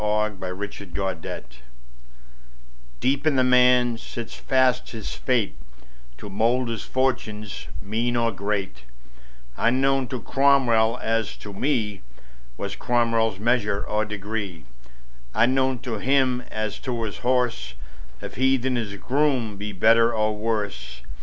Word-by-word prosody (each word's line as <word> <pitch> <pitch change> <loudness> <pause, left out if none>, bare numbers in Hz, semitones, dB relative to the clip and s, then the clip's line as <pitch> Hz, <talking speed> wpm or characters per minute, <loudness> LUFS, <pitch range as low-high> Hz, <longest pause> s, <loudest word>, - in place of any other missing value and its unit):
Ralph 105 -1 0
Waldo 95 - -5 0.2
Emerson 100 -3 -8 0.3
Fate - - -8 1.4
DEEP 140 +3 +1
in 150 - +3
the 130 - +4
man 125 -2 +4
sits 115 -1 -7
fast 130 -1 +2
his 110 -3 -6
fate 120 - 0 0.6
To - - -9
mould 115 +5 +1
his 115 -2 -3
fortunes, 110 -6 -2 0.2
mean 115 +4 -1
or 115 -1 +2
great: 100 - -3 0.7
Unknown 135 +2 +2
to 125 +1 -4
Cromwell 125 -3 +3
as 115 -2 0
to 105 - -9
me 105 -4 -1 0.6
Was 100 0 -4
Cromwell's 115 -3 +1
measure 105 -2 +1
or 105 0 0
degree; 100 -5 -5 0.7
Unknown 130 +2 +3
to 115 -4 -3
him 130 0 +2
as 110 -2 -3
to 120 -3 -3
his 110 - -4
horse, 125 -1 0 0.5
If - - -7
he 130 +1 +4
than 130 0 -1
his 105 -4 -3
groom 130 -1 0
be 105 +1 -5
better 115 +4 +5
or 110 0 +1
worse. 100 - -3
115 Hz, 130 wpm, -24 LUFS, 105-125 Hz, 1.4 s, better